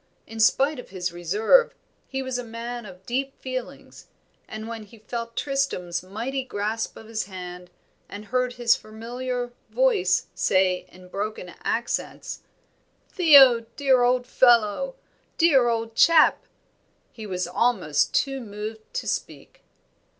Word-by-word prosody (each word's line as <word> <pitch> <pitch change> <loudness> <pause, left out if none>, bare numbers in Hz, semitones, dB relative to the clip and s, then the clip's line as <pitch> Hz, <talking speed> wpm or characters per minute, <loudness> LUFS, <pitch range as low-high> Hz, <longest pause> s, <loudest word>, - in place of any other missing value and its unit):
In 225 0 -9
spite 275 +6 +3
of - - -10
his 185 -2 -3
reserve 210 - +3 0.3
he 265 0 -3
was 260 -1 -3
a - - -4
man 235 0 -6
of 185 0 -14
deep 270 +3 -3
feelings, 255 -1 -7 0.4
and 220 0 -7
when 230 -1 -6
he 215 +2 -15
felt 230 +2 -6
Tristram's 270 -12 -1
mighty 230 +9 -4
grasp 220 -2 -3
of 225 - -11
his 220 0 -3
hand, 180 -2 -9 0.4
and 205 +1 -8
heard 250 +3 0
his 240 -1 +3
familiar 245 +3 -5 0.2
voice - - +2
say 185 -1 +1
in 180 0 -15
broken 200 -1 -5
accents, 235 +1 -3 0.7
"Theo, 280 - +7 0.2
dear 265 -3 +3
old 245 0 +2
fellow! 245 - +3 0.4
dear 280 -7 +5
old 225 -1 -2
chap!" 325 +4 +5 0.7
he 220 -2 -9
was 180 -2 -2
almost 180 -7 +1
too 270 -1 0
moved 215 0 -8
to - - -3
speak. - - -5
230 Hz, 135 wpm, -25 LUFS, 205-255 Hz, 0.7 s, Theo